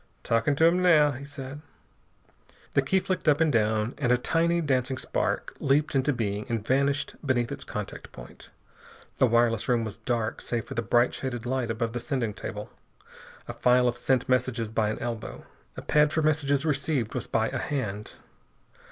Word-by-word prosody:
"Talking 115 +5 +1
to 160 - +4
'em 175 +2 +4
now," 155 -5 +5
he 140 +1 -7
said. 140 0 -8 1.1
The - - +4
key 170 +8 +2
flicked 185 -3 -1
up 145 0 +3
and 160 -3 +3
down, 110 +1 +1
and 125 -4 +1
a 125 - +5
tiny 170 +6 +1
dancing 130 -4 0
spark - - -2
leaped 145 +3 +1
into 135 +1 +2
being 105 -5 -2
and 115 -3 -2
vanished 140 +3 +1
beneath 120 -5 0
its - - -5
contact - - -7
point. - - -13 0.7
The 130 - +5
wireless 115 -1 +2
room 120 -2 +2
was 110 - -6
dark 115 0 -2
save 115 -2 -2
for - - -7
the 115 - -1
bright, 120 +2 +2
shaded 120 -3 -4
light 125 -1 -1
above 115 0 -2
the 120 - -2
sending 120 -5 -2
table. - - -7 0.8
A - - -5
file 125 0 +3
of 120 - 0
sent 125 0 0
messages 125 -3 0
by 110 -1 +1
an 110 - -3
elbow. 115 -2 -5 0.3
A - - -6
pad 150 0 +3
for 160 0 0
messages 145 -2 +1
received 140 -5 0
was - - -4
by 110 0 +1
a - - -3
hand. 105 -8 -4
125 Hz, 185 wpm, -27 LUFS, 115-145 Hz, 1.1 s, now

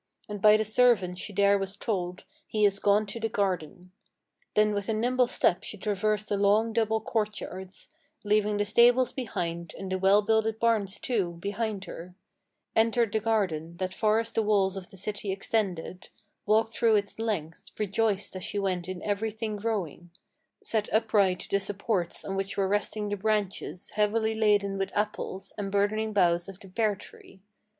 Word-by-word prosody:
And 205 -2 -6
by 215 0 +7
the 215 - 0
servant 215 -5 +3
she 210 - -5
there 200 0 +3
was 195 +1 -4
told: 180 -5 -3 0.2
He 215 -1 +2
is 200 -1 +2
gone 205 +1 +3
to 205 +3 -6
the 225 0 -1
garden. 185 -3 -2 0.6
Then 210 0 +4
with 200 0 -3
a - - +2
nimble 245 +3 +2
step 180 -7 +2
she 210 - -6
traversed 210 +1 -1
the 205 - 0
long, 210 +3 +3
double 220 -1 +1
courtyards, 205 -4 -4 0.3
Leaving 210 0 +2
the 205 - +1
stables 245 +4 +5
behind, 170 - -4
and 190 -1 -6
the 185 - 0
well 195 +2 +5
builded 220 +1 +1
barns, 215 -4 +1
too, 200 -9 -1
behind 200 +3 -3
her; 180 0 -9 0.6
Entered 230 0 +3
the 220 - +1
garden, 180 -7 -1
that 185 0 -3
far 215 +2 +2
as 230 0 -2
the 225 - +1
walls 200 -3 +2
of 190 -1 -7
the 195 - -14
city 205 +1 -3
extended; 190 -3 -2 0.4
Walked 220 +2 +3
through 230 -2 +3
its 205 +1 -1
length, 185 -8 -3
rejoiced 210 -1 0
as 185 - -5
she - - -4
went 185 -3 -1
in 185 -1 -6
every 210 +2 -1
thing 220 0 -4
growing; 200 -6 -3 0.5
Set 215 -2 -1
upright 210 -4 +2
the 200 - +3
supports 195 -2 -2
on 195 - -3
which 195 +1 -3
were 195 -1 +2
resting 205 +1 -1
the 205 - -2
branches 205 -3 -2
Heavily 220 +1 +1
laden 205 -3 +2
with 195 - -2
apples, 195 -2 -3
and 195 -1 -3
burdening 215 +2 +1
boughs 175 -3 +2
of 195 -1 -10
the 195 - -13
pear 215 +1 +1
tree. 190 0 -15
205 Hz, 175 wpm, -28 LUFS, 190-220 Hz, 0.6 s, by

